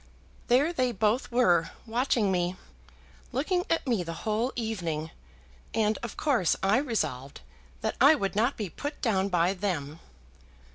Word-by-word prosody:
"There 275 +7 +3
they 255 -5 +1
both 220 +4 0
were 180 -9 +3 0.2
watching 235 -3 +1
me, 180 0 0 0.8
looking 355 +8 0
at 330 - +1
me 235 -8 +1
the 165 -1 -6
whole 220 +4 0
evening; 170 -9 -3 0.6
and, 215 -1 +1
of 235 - -6
course, 250 - +2
I 195 +4 +4
resolved 155 - -2 0.4
that - - -2
I 295 +3 +8
would 195 -9 -2
not 235 +6 +1
be 210 - -3
put 290 - -6
down 200 -5 +1
by 175 0 +2
them." 165 -6 -3
215 Hz, 145 wpm, -28 LUFS, 180-250 Hz, 0.8 s, I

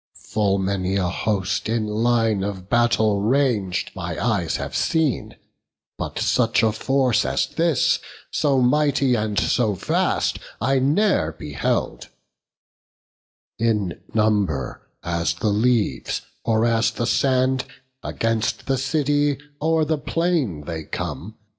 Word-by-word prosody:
Full 100 -2 +2
many 95 -1 -1
a 95 -2 +1
host 100 +2 -1
in 115 -1 0
line 110 -1 +1
of 95 -2 -5
battle 110 -4 +3
rang'd 110 -6 +1
My - - -5
eyes - - 0
have - - -4
seen; 160 -5 0 0.6
but - - -4
such 115 -1 +2
a 110 - +4
force 130 +2 +1
as - - 0
this, 165 -4 +1 0.3
So 140 -4 +2
mighty 140 0 +2
and 105 -3 -1
so 110 -5 +1
vast, - - 0 0.2
I 135 0 +2
ne'er 140 - +2
beheld: 75 -2 -2 1.5
In 105 -6 0
number 100 - 0 0.2
as 85 0 -1
the 105 +5 -1
leaves, 110 +1 0 0.2
or 110 0 +2
as 115 -1 +2
the 115 +1 -3
sand, 130 +1 +2 0.4
Against 115 -1 -1
the 135 -1 0
city 145 0 +1 0.2
o'er 160 0 +2
the 155 0 0
plain 155 - -1
they 80 -1 -5
come. 105 +7 -6
115 Hz, 120 wpm, -22 LUFS, 100-135 Hz, 1.5 s, a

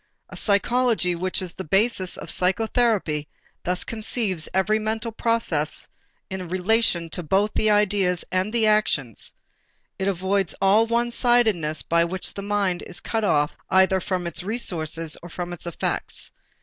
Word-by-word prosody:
A - - -10
psychology 220 -2 +2
which 185 +2 -2
is 180 - -3
the 190 - -6
basis 195 +2 +2
of - - -6
psychotherapy 190 - +1 0.4
thus 180 +1 -1
conceives 215 -6 -2
every 200 +3 +2
mental 220 +2 -2
process 220 -10 +1 0.4
in 185 -2 -6
relation 185 -1 +2
to 180 - -3
both 195 +6 +1
the 215 - +2
ideas 200 -4 +2
and 185 +3 0
the 230 -1 +2
actions; 210 - +1 0.6
it 190 - -1
avoids 190 0 0
all 205 +4 +4
one 235 +1 +1
sidedness 220 -12 +2
by 170 0 +2
which 180 +2 -2
the 200 - -6
mind 200 -3 0
is 180 - -8
cut 225 -1 -2
off 150 -7 +2 0.2
either 190 0 +4
from 180 -1 -2
its 170 0 -2
resources 165 -7 -1
or 175 - -10
from 175 +1 -5
its 175 - -7
effects. 170 - -2
190 Hz, 150 wpm, -24 LUFS, 175-220 Hz, 0.6 s, all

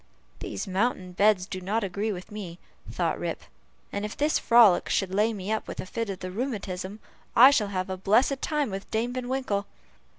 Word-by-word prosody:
"These - - -5
mountain 190 -1 -1
beds 200 0 +3
do 185 -1 -6
not 210 +5 -1
agree 200 +3 -2
with 185 +2 -7
me," 190 -5 -7 0.3
thought - - -1
Rip, - - -4 0.5
"and 200 - -3
if 210 - -5
this 300 +2 +2
frolic, 230 -6 +5
should 190 -2 0
lay 210 +3 +3
me 200 -1 -5
up 220 - -1
with - - -7
a - - -3
fit 230 +3 -4
of 195 - -5
the 185 0 -5
rheumatism, 200 -4 -4 0.4
I 260 +4 +9
shall 220 -7 +2
have 185 -2 -2
a 190 0 -4
blessed 235 +8 +2
time 295 -7 0
with 195 +1 -6
Dame 235 +3 -1
Van 250 -1 -4
Winkle." 235 -7 -1
205 Hz, 200 wpm, -27 LUFS, 190-230 Hz, 0.5 s, I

